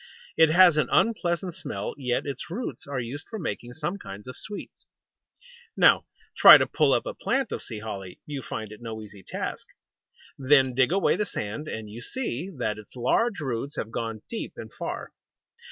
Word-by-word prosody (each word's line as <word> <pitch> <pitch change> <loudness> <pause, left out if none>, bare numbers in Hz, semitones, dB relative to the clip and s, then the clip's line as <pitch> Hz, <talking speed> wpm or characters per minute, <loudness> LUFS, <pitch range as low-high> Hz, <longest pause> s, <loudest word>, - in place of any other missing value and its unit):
It 160 -1 +6
has 175 -1 +7
an 150 - +2
unpleasant 180 -5 +1
smell, 100 -9 -5
yet 125 -4 -1
its 140 +4 -5
roots 215 - -5
are 140 -2 -2
used 125 +4 -6
for 225 - -5
making 125 - -4
some 160 +7 -3
kinds 100 - -9
of 125 - -7
sweets. 210 - -9 0.9
Now - - +6 0.3
try - - +11
to - - +2
pull - - +2
up - - +2
a - - -4
plant 270 - -1
of - - -3
Sea 110 -3 -7
Holly. 95 -4 -7
You 145 -2 -5
find 110 -3 -6
it 105 - -11
no 110 -2 -6
easy 105 -2 -12
task. - - -5 0.7
Then 135 -1 +4
dig 130 +3 +3
away 195 -1 +3
the 210 - 0
sand, 110 +7 -4
and 110 -5 -5
you 110 +3 -9
see 185 - -4
that 110 -4 -1
its 105 - -14
large 200 - +1
roots 135 0 -3
have 110 - -4
gone 115 -2 -4
deep - - -5
and - - -9
far. - - -5
130 Hz, 185 wpm, -26 LUFS, 110-175 Hz, 0.9 s, try